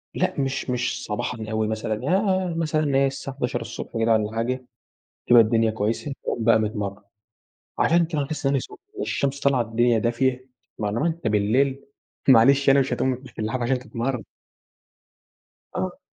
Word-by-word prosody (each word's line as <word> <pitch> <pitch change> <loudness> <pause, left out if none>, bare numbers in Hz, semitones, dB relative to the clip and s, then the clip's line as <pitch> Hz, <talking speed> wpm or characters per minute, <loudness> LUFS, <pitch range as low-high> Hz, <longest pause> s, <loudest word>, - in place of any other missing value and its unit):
لأ - - 0
مش 135 0 -2
مش 125 0 -1
صباحًا 110 +1 -3
أوي 110 0 0
مثلًا 110 0 -2 0.2
آآ 190 -3 +1
مثلًا 155 -2 0
اللي 140 -2 +1
هي 135 0 +4
الساعة 135 0 -6
11:00 125 -3 -4
كده 115 0 +2
والّا 110 -1 +1
حاجة، 125 +3 -2 0.6
بتبقى 120 -1 +7
الدنيا 115 0 +2
كويسة 110 +6 -2
باقوم 115 - -2
بقى 110 -1 +5
متمرن. 105 -2 -3 0.8
عشان 170 +1 +4
كده 155 -3 -1
باحس 145 0 -4
إن - - +4
أنا 140 - +2
سخن - - -10 0.2
والشمس 140 - -1
طالعة 140 -3 +2
الدنيا 115 +1 +2
دافية 125 +3 0 0.3
مع 105 - -1
الوقت 155 +8 -1
بالليل 125 +7 +1 0.4
معلش 135 +3 +6
يعني 135 0 +6
مش 135 - -1
هتقوم 130 - 0
من 130 +1 -2
تحت - - -15
اللحاف 115 +3 -2
عشان 125 +2 +1
تتمرن. 125 -2 -3 1.5
آه. - - -3
125 Hz, 165 wpm, -24 LUFS, 115-140 Hz, 1.5 s, بتبقى